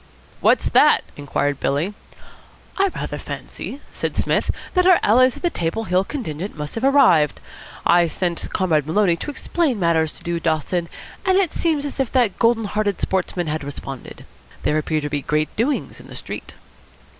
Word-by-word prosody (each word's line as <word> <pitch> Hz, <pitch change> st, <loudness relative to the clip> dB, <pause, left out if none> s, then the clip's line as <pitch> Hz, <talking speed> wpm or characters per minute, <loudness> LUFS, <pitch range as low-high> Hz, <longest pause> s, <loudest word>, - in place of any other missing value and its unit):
"What's -, -, +3 dB
that?" -, -, +5 dB
inquired 145 Hz, -1 st, -1 dB
Billy. 155 Hz, +9 st, 0 dB, 0.8 s
"I 395 Hz, 0 st, +3 dB
rather 375 Hz, -, -5 dB
fancy," 280 Hz, -, -7 dB
said -, -, -3 dB
Psmith, -, -, +1 dB, 0.2 s
"that 365 Hz, -1 st, +3 dB
our 370 Hz, -2 st, +7 dB
allies 255 Hz, +4 st, +5 dB
of -, -, -12 dB
the 345 Hz, -, +2 dB
Table 170 Hz, -, -2 dB
Hill 185 Hz, -2 st, +2 dB
contingent 195 Hz, -, -5 dB
must 150 Hz, 0 st, -5 dB
have 225 Hz, -, -4 dB
arrived. 185 Hz, -, +4 dB, 0.5 s
I 175 Hz, 0 st, +5 dB
sent 170 Hz, +1 st, -2 dB
Comrade 155 Hz, -6 st, +1 dB
Maloney 175 Hz, +1 st, +3 dB
to -, -, -5 dB
explain 295 Hz, -4 st, -1 dB
matters 165 Hz, -3 st, +2 dB
to -, -, -11 dB
Dude 170 Hz, -1 st, -2 dB
Dawson, 165 Hz, +2 st, -1 dB, 0.3 s
and 375 Hz, 0 st, +3 dB
it 385 Hz, -5 st, +2 dB
seems 310 Hz, -4 st, 0 dB
as 285 Hz, -, -5 dB
if 265 Hz, -3 st, 0 dB
that 245 Hz, -7 st, +2 dB
golden 230 Hz, -1 st, +3 dB
hearted 205 Hz, -1 st, -1 dB
sportsman 180 Hz, -2 st, -1 dB
had 155 Hz, -1 st, -3 dB
responded. 135 Hz, -2 st, -8 dB, 0.4 s
There 155 Hz, -, +2 dB
appear 155 Hz, 0 st, -1 dB
to 145 Hz, -, -3 dB
be 145 Hz, -1 st, -2 dB
great 155 Hz, +2 st, -1 dB
doings 265 Hz, +6 st, -1 dB
in -, -, -13 dB
the -, -, -10 dB
street." -, -, -7 dB
185 Hz, 175 wpm, -21 LUFS, 155-255 Hz, 0.8 s, our